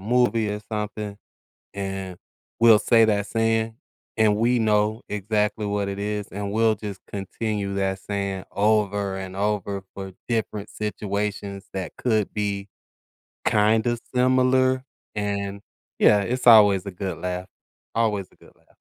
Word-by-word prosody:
movie 115 0 +2
or 105 0 -3
something, 105 -1 -4 0.6
and 95 -2 -4 0.4
we'll 115 -2 +7
say 115 -1 +5
that 105 -2 +1
saying, 115 0 0 0.4
and 110 -2 +4
we 120 +3 +2
know 110 +1 +2
exactly 105 +1 -1
what 100 -1 -1
it 100 0 -4
is, 105 0 -2
and 100 0 -4
we'll 110 +1 +3
just 100 -2 -7
continue 100 0 -3
that 95 -1 -1
saying 100 -1 -3
over 105 -2 +1
and 95 -1 -6
over 100 -1 -1
for 95 -1 -7 0.2
different 110 -3 -2
situations 100 -1 -3
that 95 -2 -4
could 110 -5 0
be 100 -1 -2 0.8
kind 110 +2 +3
of 120 -1 0
similar, 130 +1 +3 0.3
and, 100 -1 -3 0.4
yeah, 105 -1 +6
it's 125 +6 -2
always 105 -5 +7
a 100 - -5
good 95 +1 -5
laugh, 90 0 -3 0.5
always 105 -4 +1
a - - -24
good - - -19
laugh. - - -32
105 Hz, 140 wpm, -24 LUFS, 100-110 Hz, 0.8 s, we'll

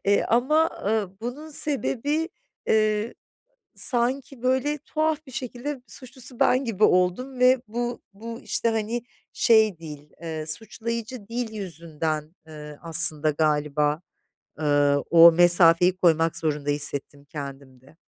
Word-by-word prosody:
eee, 200 +1 +2
ama, 305 +8 +2
ııı, 205 -3 -1
bunun 275 +7 -7
sebebi, 295 +1 -1 0.4
eee, 215 +1 +1 0.6
sanki 255 +1 -1
böyle, 260 +4 0
tuhaf 310 +1 -2
bir 260 - -13
şekilde 255 +1 -6
suçlusu 255 -1 -9
ben 255 +2 +3
gibi 220 -3 0
oldum 185 +9 +1
ve 250 0 +4
bu 240 +2 -4
bu 230 +3 -8
işte, 230 - -1
hani, 225 +1 -2 0.3
şey 220 -6 +3
değil, 150 -2 -11
eee, 160 -2 -5
suçlayıcı 225 +4 -4
dil 230 -1 -4
yüzünden, 160 -4 -5
eee, 150 -1 -10
aslında 155 -2 +3
galiba, 150 0 0 0.6
ııı, 145 -2 +2
o 170 0 +8
mesafeyi 175 +1 +5
koymak 165 -2 +2
zorunda 150 -2 -2
hissettim 145 0 0
kendimde. 140 -1 -10
210 Hz, 120 wpm, -24 LUFS, 155-245 Hz, 0.6 s, o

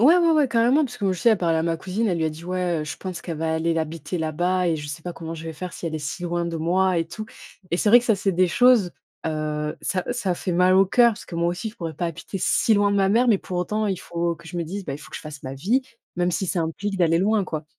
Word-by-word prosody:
ouais, 300 +9 +7
ouais, 335 -2 +4
ouais, 300 -4 +3
carrément, 240 +6 +3
parce 245 -1 -7
que 195 -1 +1
je 180 - -5
sais, 235 - +5
elle 220 - +3
parlait 165 -2 +1
à 160 - 0
ma 165 -1 0
cousine. 215 +5 -1
Elle 175 -3 0
lui 160 - 0
a - - -1
dit: 155 +2 -10
«Ouais, 180 -2 -1
heu, 150 - -3
je 145 - -6
pense 185 -3 -6
qu'elle 165 -3 -5
va 160 0 0
aller 165 +1 +1
l'habiter 160 +1 -3
là-bas 175 +3 0
et 165 - +1
je 150 -1 -6
sais 155 +2 -6
pas 175 +1 -5
comment 165 0 -6
je 160 - -8
vais 165 - -5
faire 180 +1 -6
si - - -6
elle 160 - -3
est 155 - -1
si 145 +4 -5
loin 175 0 -1
de 165 -1 -3
moi 180 +2 +2
et 165 - -1
tout», 215 +6 -6 0.5
et 170 - +1
c'est - - +2
vrai 240 +2 +9
que - - -9
ça, 225 - +4
c'est 195 0 0
des 180 0 +3
choses, 245 -4 +4 0.4
heu, 150 -1 -2
ça 185 -2 -1
ça 195 -7 -1
fait 180 - -3
mal 180 +2 +4
au 195 +1 +5
cœur 240 +5 +5
parce - - -10
que 170 - -9
moi 170 +1 +1
aussi, 180 +5 -3
je - - -22
pourrais 165 -2 -5
pas 170 +4 -2
habiter 170 +4 -6
si 225 - +3
loin 205 0 +3
de - - +1
ma 195 -1 +3
mère, 235 +4 +4
mais 210 -4 +4
pour 180 -1 -5
autant, 210 +5 -1
il 190 -3 -1
faut 170 0 -2
que 170 - -16
je 175 - -7
me 170 - 0
dise: 195 +4 -5
«Bah, 140 - -3
il 145 - -8
faut 150 - -13
que - - -6
je - - -7
fasse 150 -2 -9
ma 130 0 -5
vie, 215 - +1 0.3
même 175 0 +1
si 180 +3 -1
ça 180 0 -1
implique 195 +5 -3
d'aller 165 -1 +3
loin, 210 +3 +2
quoi». 155 -3 -5
175 Hz, 320 wpm, -24 LUFS, 165-200 Hz, 0.5 s, vrai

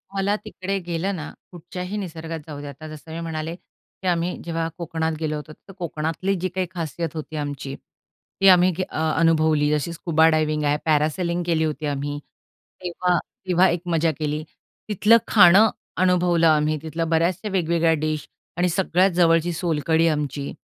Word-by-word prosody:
मला 195 +1 +1
तिकडे 195 -2 -3
गेलं 175 +3 -1
ना, 155 -3 -6 0.2
कुठच्याही 180 +3 -6
निसर्गात 165 -4 -5
जाऊ 150 -2 -7
द्या 145 - -7
आता 140 +3 -10
जसं 155 +1 -10
मी 165 - -4
म्हणाले, 165 0 -4
की 185 +1 -13
आम्ही 175 0 0
जेव्हा 165 -1 -2
कोकणात 160 -1 -2
गेलो 155 -1 -2
होतो, 150 +1 -7
तर 195 - -16
कोकणातली 165 +3 -2
जी 185 - -1
काही 185 -1 0
खासियत 165 -2 -4
होती 155 0 -6
आमची, 145 -2 -4
ती 195 - -5
आम्ही 180 0 +6 0.2
अ, - - -6 0.2
अनुभवली. 155 -2 +3
जशी 150 +3 -1
स्कुबा 160 -1 +3
डायव्हिंग 155 -1 +1
आहे, 145 0 +2
पॅरासेलिंग 160 +3 +1
केली 165 -2 +1
होती 155 0 -2
आम्ही. 145 0 -3 0.6
तेव्हा 180 0 0 0.3
तेव्हा 180 +1 +4
एक 170 0 -1
मजा 165 -1 +2
केली. 150 0 -2 0.5
तिथलं 210 +3 +5
खाणं 200 +2 +7 0.3
अनुभवलं 180 -2 +3
आम्ही. 155 0 +3
तिथल्या 160 +1 -3
बऱ्याचशा 170 +5 0
वेगवेगळ्या 170 -3 +2
डिश 155 -1 -2 0.3
आणि 180 +1 +2
सगळ्यात 185 +2 +2
जवळची 170 -1 +3
सोलकढी 165 -1 +1
आमची, 145 -2 -2
165 Hz, 160 wpm, -23 LUFS, 155-180 Hz, 0.6 s, खाणं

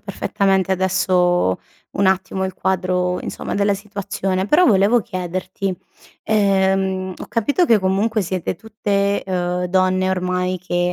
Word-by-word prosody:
perfettamente 195 -2 0
adesso, 180 - +2 0.3
un 200 - +1
attimo, 190 0 0
il 190 - -3
quadro, 180 -1 0
insomma, - - -5
della 200 0 +2
situazione. 195 -1 -3
Però 345 +8 +4
volevo 210 +2 +4
chiederti, 185 0 -4 0.5
ehm, 190 -2 +1
ho - - -7
capito 285 - +1
che 230 -8 +4
comunque 205 +4 +1
siete 185 0 -3
tutte, 200 -1 -1
ehm, 180 -1 -1
donne, 185 +1 +1
ormai, 180 0 -1
che 175 0 -1
190 Hz, 125 wpm, -20 LUFS, 185-200 Hz, 0.5 s, Però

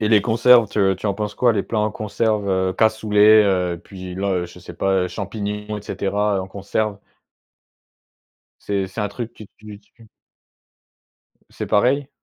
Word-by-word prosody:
Et 105 - +1
les 110 -1 +5
conserves, 115 +1 +5
te 95 -2 +1
tu 95 - -6
en 100 - 0
penses 105 0 -4
quoi? 120 -2 +3
Les 100 -3 0
plats 115 - -2
en 105 0 0
conserve, 105 0 -1
heu, 95 -1 +1
cassoulet, 110 0 +4
heu, 90 -3 0
puis 95 -2 -9
le 95 -2 -1
je 90 - -14
sais 90 - -11
pas, 95 - 0
heu, - - -3
champignons 105 +2 -5
et - - -12
cetera, 105 0 -1
heu, - - 0
en 95 - -6
conserve? 100 +1 -3 1.6
C'est 100 -2 -2
c'est 100 - -7
un 105 - -1
truc 115 +3 -6
que 110 - -11
tu 105 -1 -11
tu 110 +2 -22 1.4
C'est - - -6
pareil? 130 +6 +2
105 Hz, 175 wpm, -21 LUFS, 95-110 Hz, 1.6 s, les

